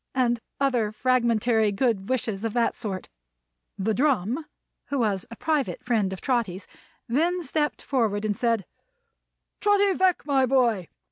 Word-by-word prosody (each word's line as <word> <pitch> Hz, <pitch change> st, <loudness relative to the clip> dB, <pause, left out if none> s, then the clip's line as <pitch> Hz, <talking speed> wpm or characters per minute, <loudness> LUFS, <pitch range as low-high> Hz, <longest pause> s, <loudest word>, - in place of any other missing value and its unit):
and 240 Hz, -2 st, +2 dB, 0.2 s
other 245 Hz, -6 st, +1 dB
fragmentary 235 Hz, -2 st, +2 dB
good 200 Hz, -2 st, 0 dB
wishes 225 Hz, -5 st, -1 dB
of 225 Hz, -2 st, -2 dB
that 235 Hz, -1 st, +1 dB
sort. 195 Hz, -5 st, -4 dB, 0.7 s
The 215 Hz, +3 st, 0 dB
Drum 265 Hz, -, +1 dB, 0.4 s
(who 285 Hz, -, -2 dB
was 205 Hz, -6 st, 0 dB
a 230 Hz, -, -8 dB
private 300 Hz, -2 st, -1 dB
friend 220 Hz, -6 st, +1 dB
of 190 Hz, -, -6 dB
Trotty's) 210 Hz, -8 st, -1 dB, 0.4 s
then 340 Hz, +9 st, +1 dB
stepped 295 Hz, -5 st, -1 dB
forward 220 Hz, -6 st, 0 dB
and 210 Hz, -1 st, 0 dB
said: 230 Hz, -3 st, 0 dB, 0.9 s
"Trotty 405 Hz, -1 st, +3 dB
Veck, 370 Hz, -1 st, +2 dB
my 270 Hz, -3 st, +3 dB
boy! 235 Hz, -9 st, +2 dB
235 Hz, 140 wpm, -25 LUFS, 210-270 Hz, 0.9 s, Trotty